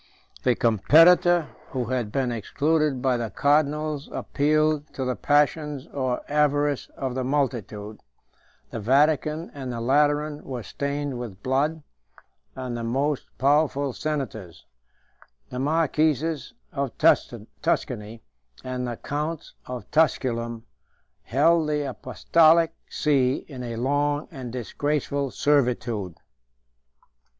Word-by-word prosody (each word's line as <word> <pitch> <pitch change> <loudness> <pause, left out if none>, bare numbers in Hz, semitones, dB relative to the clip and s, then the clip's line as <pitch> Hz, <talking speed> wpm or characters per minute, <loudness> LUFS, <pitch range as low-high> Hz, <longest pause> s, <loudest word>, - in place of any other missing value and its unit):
The 125 -2 +2
competitor 165 - +5 0.2
who 130 -2 -2
had 120 -5 -1
been 130 -1 0
excluded 145 +4 0
by 130 -2 +2
the 115 -2 -3
cardinals 150 +1 +1
appealed 155 +1 0
to 130 - -2
the 125 0 -1
passions 145 -1 +1
or 130 -3 -1
avarice 145 -1 +1
of 130 -2 -3
the 130 0 -2
multitude; 120 -6 -2 0.7
the - - -4
Vatican 150 - +2
and 135 -3 -5
the 120 - -4
Lateran 145 +4 +1
were 125 -4 -6
stained 140 +3 -3
with 105 -5 -8
blood; 145 +4 0 0.7
and 130 -2 -4
the 120 - -4
most 135 +5 -1
powerful 140 -1 +2
senators, 125 - -4 0.9
the 125 - -4
marquises 155 +1 0 0.2
of 140 -4 -3
Tuscany 110 +2 0 0.4
and 125 -1 -3
the 120 -1 -4
counts 150 +2 -4
of 125 -1 -7
Tusculum, 120 -7 +1 0.6
held 155 +4 +2
the 150 -1 0
apostolic 160 +6 +3 0.2
see 135 -3 +1
in 130 -4 -8
a 120 -2 -5
long 145 +4 0
and 125 -3 -7
disgraceful 140 +3 -2
servitude. 120 - 0
140 Hz, 110 wpm, -25 LUFS, 125-150 Hz, 0.9 s, competitor